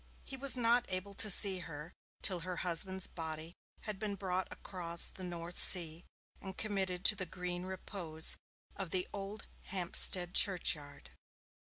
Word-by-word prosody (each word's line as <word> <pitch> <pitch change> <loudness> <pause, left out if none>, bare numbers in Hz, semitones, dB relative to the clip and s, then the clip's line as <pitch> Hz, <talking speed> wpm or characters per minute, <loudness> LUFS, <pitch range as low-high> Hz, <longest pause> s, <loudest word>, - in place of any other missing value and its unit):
He 270 - -8
was 265 0 +1
not 240 0 +1
able 185 +2 -6
to 215 +2 -1
see 195 -1 +7
her 165 -1 -11 0.3
till 185 -3 -2
her 180 +2 -7
husband's 185 +2 0
body 160 0 -7 0.3
had 210 -3 -6
been 205 -1 -5
brought 185 -1 -4
across 170 -3 -1
the 185 - -11
North 175 -1 -5
Sea 170 -2 +6 0.4
and 190 -1 -10
committed 190 -4 -4
to 215 - +6
the 185 -3 -6
green 180 +1 -7
repose 175 -4 0 0.4
of 195 -3 -4
the 180 +1 -2
old 200 +2 -8 0.2
Hampstead 180 -1 +3
churchyard. 150 -7 +1
185 Hz, 150 wpm, -32 LUFS, 170-195 Hz, 0.4 s, see